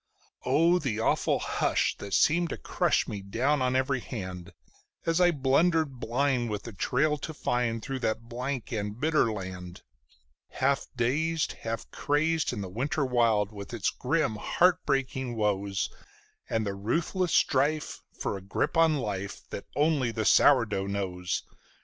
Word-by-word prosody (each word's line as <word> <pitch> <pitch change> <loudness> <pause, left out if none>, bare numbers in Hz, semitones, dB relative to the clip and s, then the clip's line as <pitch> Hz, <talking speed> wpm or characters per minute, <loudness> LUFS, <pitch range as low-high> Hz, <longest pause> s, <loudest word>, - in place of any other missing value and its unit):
Oh, 165 +7 +4
the 125 -9 -2
awful 115 - +2
hush - - 0
that 100 -3 -3
seemed 170 - +3
to - - -4
crush - - +1
me 100 - -5
down 130 +9 0
on 130 0 +1
every 130 +1 +1
hand, 95 -6 -7 0.5
As 165 +2 +2
I 175 - +6
blundered 150 -1 +2
blind 125 0 0
with 105 0 -4
a 115 - -7
trail 145 - +1
to 160 - -6
find 120 -4 -1
through 135 -1 -4
that 115 -1 -2
blank 125 +1 -4
and 105 0 -3
bitter 155 -5 +2
land; 90 -3 -7 0.7
Half 135 +1 +1
dazed, 150 +7 0
half 115 0 -5
crazed 155 +2 +1
in 105 - -4
the 95 - -4
winter 135 +8 -1
wild, 115 -5 +2
with 100 +2 -7
its 110 - 0
grim 130 -5 0
heart 180 - +2
breaking 130 -2 -1
woes, 100 -3 0 0.6
And 110 -1 0
the 100 - -2
ruthless 165 - -1
strife 145 +3 +1
for - - -3
a - - -9
grip 100 - -2
on 165 -2 +4
life 100 -5 -4
that - - -6
only 145 -3 +2
the 110 -1 -2
sourdough 115 -9 +4
knows! 90 -3 -2
125 Hz, 155 wpm, -28 LUFS, 105-150 Hz, 0.7 s, I